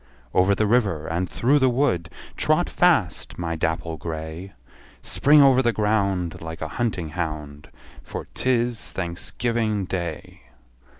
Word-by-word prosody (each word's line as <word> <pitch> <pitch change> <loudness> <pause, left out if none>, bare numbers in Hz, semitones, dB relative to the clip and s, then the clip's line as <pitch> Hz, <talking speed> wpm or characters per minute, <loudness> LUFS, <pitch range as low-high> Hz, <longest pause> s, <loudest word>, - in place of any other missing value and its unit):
Over 95 +2 +4
the 110 - +1
river, 100 -9 +1
and 85 +3 -2
through 140 +5 +2
the 130 -1 +4
wood, 120 -10 +1 0.3
Trot - - +2
fast, - - +2
my 85 -1 -2
dapple 80 0 -2
grey! 80 +4 -6 0.5
Spring 145 0 +5
over 130 -1 +6
the 120 -2 +2
ground, 100 -6 0
Like 80 0 -6
a - - -2
hunting 100 -6 -2
hound, 75 -2 -5 0.3
For - - -7
't 130 - -1
is 120 -2 +1
Thanksgiving 105 +4 -2
Day! 85 -4 -5
95 Hz, 135 wpm, -24 LUFS, 80-115 Hz, 0.5 s, over